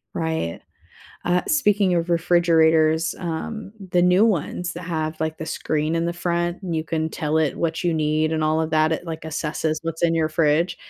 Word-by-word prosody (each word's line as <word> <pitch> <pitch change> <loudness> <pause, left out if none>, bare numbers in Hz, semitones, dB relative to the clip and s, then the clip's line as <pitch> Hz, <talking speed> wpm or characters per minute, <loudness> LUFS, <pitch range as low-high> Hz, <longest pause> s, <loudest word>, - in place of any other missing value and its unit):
Right, 160 - -2 0.6
uh, 180 0 +2
speaking 210 - +3
of 170 0 -1
refrigerators, 165 -2 +3
um, 195 +5 -5 0.2
the 175 - +4
new 180 +4 +5
ones 180 -3 -1
that 175 - -7
have, 160 -2 -3
like, 160 0 -3
the 160 - -5
screen 155 +1 -1
in 165 - 0
the 170 - -1
front, 175 +1 -2
and 175 -3 -3
you 155 - -2
can 160 0 -1
tell 155 0 -1
it 155 -3 0
what 165 -1 -1
you 175 -2 +1
need, 155 0 +1
and 160 -1 0
all 155 +1 +2
of 160 - -1
that, 155 0 +3
it 160 - -3
like 160 -1 -5
assesses 155 0 -2
what's 165 0 -5
in 165 -1 +3
your 160 -1 +1
fridge, 160 +2 +1
165 Hz, 200 wpm, -23 LUFS, 155-175 Hz, 0.6 s, new